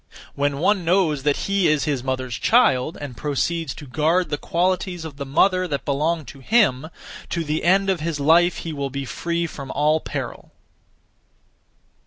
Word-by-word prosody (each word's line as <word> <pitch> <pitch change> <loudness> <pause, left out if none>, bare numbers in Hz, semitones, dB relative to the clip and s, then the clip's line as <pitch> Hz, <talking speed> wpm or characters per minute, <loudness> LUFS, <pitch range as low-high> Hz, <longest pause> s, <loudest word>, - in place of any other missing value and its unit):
When 140 0 -1
one 185 +5 +2
knows 165 -4 +2
that 145 +1 0
he 195 -2 +2
is 150 -2 +2
his 140 -5 -1
mother's 130 -1 -3
child, 160 - +3
and 145 -4 -7
proceeds 150 +2 -2
to 150 - -10
guard 160 +6 +1
(the 145 - 0
qualities 180 0 -1
of) 150 -3 -8
the 140 -1 -5
mother 185 +6 +2
that 140 -4 -3
belong 155 +3 0
to 140 - -11
him, 160 - +2 0.4
to 170 - -2
the 155 0 -2
end 195 +3 +3
of 190 -3 +1
his 155 -1 -3
life 170 +5 +4
he 165 - -4
will 140 -2 -3
be 140 +1 -5
free 170 +5 -2
from 140 -4 -8
all 150 +3 +2
peril. - - -6
155 Hz, 175 wpm, -22 LUFS, 140-175 Hz, 0.4 s, life